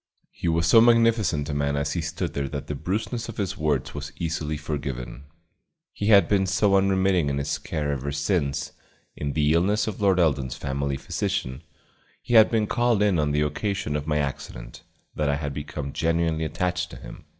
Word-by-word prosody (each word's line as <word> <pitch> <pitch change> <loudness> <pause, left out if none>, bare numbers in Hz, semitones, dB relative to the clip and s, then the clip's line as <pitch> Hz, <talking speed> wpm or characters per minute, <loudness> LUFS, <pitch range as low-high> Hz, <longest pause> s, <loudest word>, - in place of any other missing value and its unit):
He - - -5
was 85 0 +2
so 110 +7 +7
magnificent 115 -10 +3
a - - -2
man 70 0 0
as 70 +1 -1
he 85 - -1
stood 85 +1 -3
there 70 -1 -2
that 70 -1 -5
the - - -4
brusqueness 105 - -3
of 115 - -8
his 100 -1 -2
words 75 -7 -1
was 75 0 -6
easily 80 -2 -2
forgiven; 70 -3 -5 0.7
he 105 - -3
had 100 -3 +6
been 95 -2 +2
so 95 +1 +3
unremitting 95 -4 +2
in 70 - -1
his 70 +1 -2
care 75 -2 -3
ever 70 0 -3
since, 75 0 -1 0.4
in 70 -1 -3
the 75 -1 +2
illness 100 +6 +2
of 105 -2 -5
Lord 95 -2 +3
Eldon's 70 -7 +1
family 70 0 -2
physician, 65 +1 -3 0.6
he - - -5
had 110 -2 +8
been 110 -2 +1
called 120 -1 +2
in 100 -5 +2
on 75 -1 +1
the 75 +1 +1
occasion 75 +1 -2
of 75 0 -3
my 75 -1 +1
accident, 65 -4 -5 0.3
that 75 -1 -1
I 70 - +2
had 70 -1 -4
become 75 -1 -5
genuinely 80 -1 0
attached 90 +2 -2
to - - -10
him. - - -11
80 Hz, 195 wpm, -25 LUFS, 70-95 Hz, 0.7 s, had